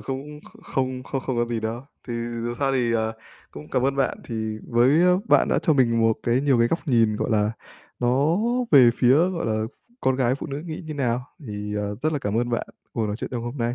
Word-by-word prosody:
không 135 0 -4 0.2
kh - - -16
không 130 -1 -2
không 135 0 -3
không 130 -1 -3
có 120 - +2
gì 115 -1 -2
đâu. 110 +2 -3 0.3
Thì - - -3 0.3
dù 120 0 -2
sao 135 +2 0
thì, 125 -3 +1
ờ, 110 -1 0 0.4
cũng 75 +1 -10
cảm 125 - +1
ơn 135 +1 +1
bạn 135 - 0
thì 110 -2 -4
với 125 +7 +4 0.3
bạn - - +5
đã - - +2
cho 165 - +3
mình 120 -5 +3
một 115 0 +4
cái 120 +2 +2
nhiều 140 -4 +3
cái 115 0 +4
góc 165 - 0
nhìn, 115 -5 +3
gọi 115 - -2
là, 105 0 +2 0.5
nó 135 +8 +2 0.3
về 130 -5 +8
phía, 125 +1 +4 0.2
gọi 170 -7 -3
là, 110 0 0 0.4
con 130 0 +1
gái, 130 -1 +2
phụ - - -6
nữ 140 +2 -5
nghĩ 160 +1 -6
như 155 - -5
nào 125 -3 -1 0.2
thì, 105 0 -4
à, 105 - -1 0.2
rất 155 +1 +1
là 145 - 0
cảm 105 -4 -3
ơn 120 0 -1
bạn 120 - -1 0.3
cuộc 110 -2 -1
nói 105 - -3
chuyện - - -6
trong 120 -2 -3
hôm 120 +4 -5
nay. 120 +1 0
120 Hz, 245 wpm, -24 LUFS, 115-135 Hz, 0.5 s, về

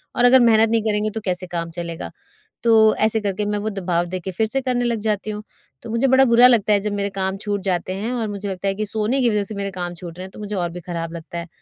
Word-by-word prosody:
और 245 - +3
अगर 255 +1 +7
मेहनत 225 -2 +5
नहीं 225 0 +2
करेंगे 215 -1 0
तो - - -1
कैसे 185 -1 -2
काम 170 -1 -4
चलेगा। 170 0 -6 0.5
तो 220 -2 +5
ऐसे 220 +1 +3
करके 205 0 -2
मैं 210 0 -1
वो 215 +1 -2
दबाव 180 -4 -1
देके 185 +1 -4
फिर 220 +5 0
से 270 +4 -1
करने 250 -2 0
लग 235 -2 0
जाती 210 0 -2
हूँ, 210 0 -6 0.4
तो 230 - -9
मुझे 230 +4 +1
बड़ा 265 +1 +5
बुरा 240 0 +7
लगता 220 -4 +4
है 205 - +4
जब 210 0 -2
मेरे 200 0 -1
काम 190 0 -2
छूट 205 0 -3
जाते 185 -1 -1
हैं 215 +5 -3
और 230 -3 -2
मुझे 205 0 -5
लगता 190 +1 -4
है 195 - 0
कि 215 +2 -2
सोने 220 +5 0
की 245 - +3
वजह 210 -2 +1
से 210 +2 -7
मेरे 200 0 -3
काम 175 -2 -5
छूट 170 0 -9
रहे 185 - -6
हैं, 190 - -11
तो - - -13
मुझे 210 0 -5
और 175 -2 -1
भी 180 +1 -8
खराब 165 -1 -4
लगता 170 0 -8
है। 170 0 -5
205 Hz, 285 wpm, -21 LUFS, 185-225 Hz, 0.5 s, अगर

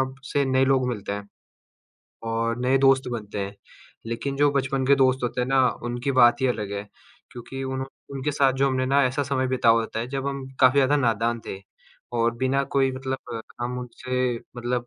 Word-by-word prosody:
आपसे 135 +2 -1
नए 130 0 +3
लोग 130 -1 +2
मिलते 105 -4 -3
हैं 100 0 -6 1.0
और 115 +1 -1
नए 130 +2 +3
दोस्त 135 -1 +4
बनते 105 -3 -5
हैं। 100 +1 -4 0.5
लेकिन 135 +4 -3
जो 145 +1 +4
बचपन 135 -1 0
के 140 - +6
दोस्त 130 -1 +3
होते 125 0 -1
हैं 125 - -1
ना, 130 -2 +4
उनकी 120 +3 -3
बात 120 +3 +6
ही 130 - +2
अलग 105 -5 -2
है, 100 0 -5 0.4
क्योंकि 135 +2 -7
उन 130 0 -3 0.3
उनके 140 +1 -2
साथ 135 -2 +3
जो 140 - +5
हमने 130 -1 0
ना 140 +2 +3
ऐसा 135 +3 -1
समय 130 -1 0
बिताया 125 -3 +4
होता 115 -1 -1
है 120 - -3
जब 135 +1 -3
हम 140 -1 -3
काफ़ी 130 +2 +6
ज़्यादा 140 +2 +4
नादान 115 -2 +1
थे 95 - -7 0.6
और 115 0 +3
बिना 130 +2 +1
कोई 135 -1 +3
मतलब 130 -3 -5 0.2
हम 125 +1 -2
उनसे 125 0 -2 0.2
मतलब 120 0 -2
130 Hz, 195 wpm, -25 LUFS, 120-135 Hz, 1.0 s, के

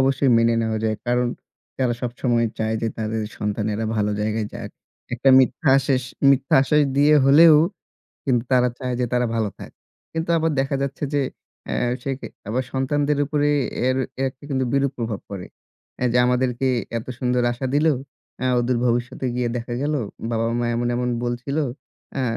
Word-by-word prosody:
অবশ্যই 135 +1 +2
মেনে 115 0 +3
নেওয়া 110 -1 -1
যায়। 110 -1 +1
কারণ 125 0 +2 0.5
তারা 130 -2 +1
সবসময় 120 -1 0
চায় 110 0 0
যে - - +1
তাদের 110 0 -2 0.2
সন্তানেরা 105 +1 -2
ভালো 105 -1 +1
জায়গায় 110 0 -1
যাক। - - -7 0.4
একটা 125 +3 +1
মিথ্যা 135 +4 +2
আশ্বেস 135 -2 +1 0.3
মিথ্যা 135 0 +2
আশ্বাস 150 +3 +3
দিয়ে 145 +2 +5
হলেও 155 +3 +8 0.7
কিন্তু 125 -4 +2
তারা 125 -1 +4
চায় 130 -2 -3
যে, - - +2
তারা 125 0 +2
ভালো 110 -2 0
থাক। - - -9 0.4
কিন্তু 165 +1 -2
আবার 160 0 +1
দেখা 135 +1 -1
যাচ্ছে 140 +1 -4
যে 145 - +3 0.5
অ্যা - - -2 0.3
সে 135 - -2
কে - - -6 0.2
আবার 125 +4 0
সন্তানদের 145 +2 0
উপরে 145 0 +1 0.4
এর 130 0 +2 0.3
একটা 130 +2 -15
কিন্তু 130 -1 0
বিরূপ 140 -1 +1
প্রভাব 115 -3 -3
পড়ে। 95 -3 -6 0.5
অ্যা 125 - +1
যে - - +5
আমাদেরকে 125 +1 0 0.3
এত 115 - -9
সুন্দর 125 0 +1
আশা 125 +2 -4
দিল, 150 +2 +3 0.5
অ্যা 130 - -2
অদূর 120 +1 +1
ভবিষ্যতে 120 +2 -1
গিয়ে 125 -1 0
দেখা 120 0 -5
গেল। 150 +1 0 0.4
বাবা-মা 115 +1 0
এমন, 120 +1 0
এমন 125 0 -1 0.2
বলছিল 120 +4 -3 0.6
অ্যা 135 - -1
125 Hz, 170 wpm, -22 LUFS, 115-135 Hz, 0.7 s, হলেও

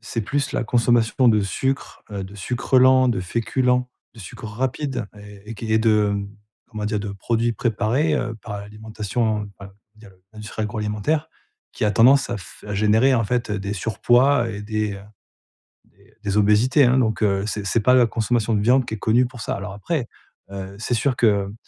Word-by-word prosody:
C'est 115 0 -4
plus 140 +7 -2
la - - -1
consommation 120 +1 +2
de 110 -2 +4
sucre, 130 +8 -3
heu, 100 -2 -4
de 95 +2 -9
sucre 125 +5 0
lent, 130 0 +5
de 100 -6 0
féculents, 125 +5 0 0.2
de 110 - -12
sucre 95 +4 -9
rapide 125 +1 -3 0.4
et 115 +1 -8
qui 110 +1 -4
est 110 - +4
de, 105 -2 +2 0.5
comment 105 -3 -6
dire? 105 0 -1
de 105 - -5
produits 115 +4 -1
préparés, 120 +8 0
heu, 115 -5 -2
par 105 -3 -6
l'alimentation, 105 0 -3 0.5
il 110 - -20
y - - -13
a - - -15 0.2
l'industrie 110 0 -6
agroalimentaire 105 +9 -2 0.4
qui 110 - -2
a 105 - +3
tendance 135 +6 +5
à - - -2
f 90 - -13
à 105 - -4
générer, 110 +6 +3
en 115 -3 +1
fait, 120 +1 -1
heu, 105 - -1
des 100 +1 -4
surpoids 120 +5 +2
et 105 -1 -6
des, 105 -1 -2 0.8
heu, - - -28
des 100 0 -2
obésités, 105 +7 +4
hein 125 +2 +3
donc, 110 -3 0
heu, 100 -1 +1
c'est 105 -2 -4
c'est 115 - +1
pas 125 +4 +4
la 125 -2 +5
consommation 115 0 0
de 105 - +1
viande 125 +4 +3
qui - - -4
est 110 - -7
connue 120 +4 +2
pour 120 -2 -11
ça. - - -3
Alors 100 0 -6
après, 130 +4 -3 0.4
heu, 100 0 -7
c'est 115 +2 -2
sûr 125 +2 0
que, 100 -3 +2
110 Hz, 195 wpm, -22 LUFS, 105-125 Hz, 0.8 s, lent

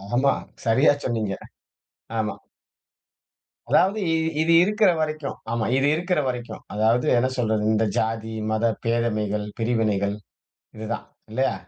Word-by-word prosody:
ஆமா. 135 +3 +4 0.3
சரியா 120 +7 +5
சொன்னீங்க. 110 -5 -1 0.9
ஆமா. 110 -1 -1 1.3
அதாவது 195 +4 +3
இ - - +2 0.3
இது 165 +1 +3
இருக்கற 210 +1 +3
வரைக்கும். 155 -2 -2 0.2
ஆமா, 115 -2 0
இது 135 +1 +2
இருக்கற 175 +1 0
வரைக்கும். 125 -2 -4
அதாவது 115 +6 +2
என்ன 130 +2 +2
சொல்றது? 110 -3 +1
இந்த 110 0 +2
ஜாதி, 110 0 -1 0.2
மத, 110 +1 +1
பேதமைகள், 110 -3 0
பிரிவினைகள் 110 -4 +1 0.6
இதுதான். 110 +1 -5 0.3
இல்லையா? 130 +4 +1
115 Hz, 120 wpm, -24 LUFS, 110-140 Hz, 1.3 s, சரியா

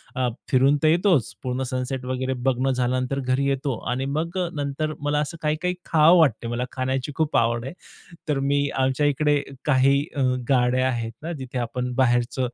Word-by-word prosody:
अ, 130 -1 +1 0.2
फिरून 135 +3 +4
तर - - +5
येतोच, 170 - +3
पूर्ण 130 +1 -2
सनसेट 130 0 -3
वगैरे 130 +1 -2
बघणं 135 +1 +1
झाल्यानंतर 130 +2 -1
घरी 130 +1 0
येतो 135 -2 -1 0.2
आणि 130 +2 -1
मग 160 +6 -2
अ, 180 - 0
नंतर 145 +1 -2
मला 145 +1 0
असं 150 +3 -3
काही-काही 155 +4 0
खावं 165 +2 +5
वाटते. 120 -7 +2
मला 120 +1 -2
खाण्याची 130 +2 -2
खूप 155 -3 +1
आवड 115 0 +1
आहे. 135 - -6 0.6
तर 140 -2 +1
मी 145 0 +2
आमच्या 135 +2 +1
इकडे 145 0 +2 0.2
काही 135 -1 +4 0.2
अ, 140 - -1 0.3
गाड्या 130 0 +3
आहेत 115 -2 -3
ना, 165 +2 -5
जिथे 130 -1 -6
आपण 125 +1 -3
बाहेरच 120 0 +1
135 Hz, 175 wpm, -24 LUFS, 125-145 Hz, 0.6 s, तर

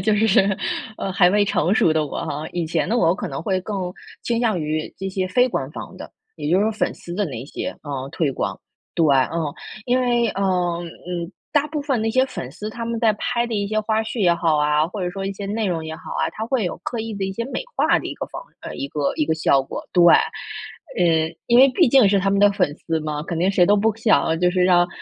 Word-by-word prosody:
就 215 +1 +3
是， 200 -2 +3 0.4
呃， 190 - -3
还 180 - +5
未 205 +1 +3
成 200 -1 +1
熟 160 - +4
的 155 -1 +1
我 - - -6
啊， 150 0 -4
以 175 -2 -1
前 160 - -1
的 235 - +1
我， 165 - +3
我 170 - +3
可 - - -5
能 - - -5
会 190 -4 0
更 185 -2 -4 0.3
倾 235 0 0
向 220 -7 +1
于 155 0 -3
这 195 0 -4
些 185 -1 -2
非 250 +5 +3
官 135 - -3
方 - - -9
的， - - -9 0.3
也 150 - -3
就 180 - +4
是 - - +3
说 220 - +1
粉 215 - -1
丝 175 - -10
的 205 +1 0
那 125 -4 -6
些， 140 - -5
呃， 135 -2 -5
推 150 -3 0
广， - - -3 0.4
对， 165 - +2
嗯。 145 +2 +2 0.3
因 250 +1 +2
为， 240 -2 +2
嗯 180 -3 -1
嗯， 170 +1 -6 0.2
大 295 0 +3
部 300 -1 -3
分 270 -5 0
那 225 +1 0
些 255 +3 +3
粉 - - -6
丝， 215 +1 -6
他 230 +1 -5
们 230 -1 -2
在 220 -2 +3
拍 240 +2 -1
的 230 - -4
一 205 -1 0
些 215 +1 -1
花 220 +1 0
絮 225 +1 -5
也 175 -3 +4
好 165 -2 +1
啊， 150 +1 +2
或 195 +3 -6
者 180 - -1
说 195 +1 -5
一 195 - -2
些 200 +1 -7
内 215 +2 -1
容 165 -4 -2
也 160 - -5
好 165 - -12 0.2
啊， - - +1
它 220 +1 -5
会 245 -5 0
有 175 - -3
刻 235 - -4
意 220 -1 -5
的 195 -1 -3
一 195 - -3
些 230 +4 -3
美 275 - -4
化 - - +3
的 - - -6
一 - - -5
个 - - -5
方 - - -8 0.2
呃， - - -7
一 280 - -4
个 145 - -1
一 150 - +2
个 160 - +1
效 140 -4 +3
果 - - -7
对。 175 - +5 1.0
嗯， 165 -2 +2
因 240 +1 +6
为 270 +1 +8
毕 340 - +5
竟 245 -5 +6
是 200 -1 +3
他 195 +1 +1
们 200 - +2
的 205 0 +6
粉 180 -7 +1
丝 165 -1 -2
嘛， 150 -1 -3
肯 170 - -4
定 180 +4 +2
谁 180 -3 +4
都 205 +2 +4
不 220 +2 +2
想 215 -7 +2
就 180 +1 +3
是 180 0 +1
让 175 -1 +5
190 Hz, 285 characters per minute, -22 LUFS, 165-220 Hz, 1.0 s, 为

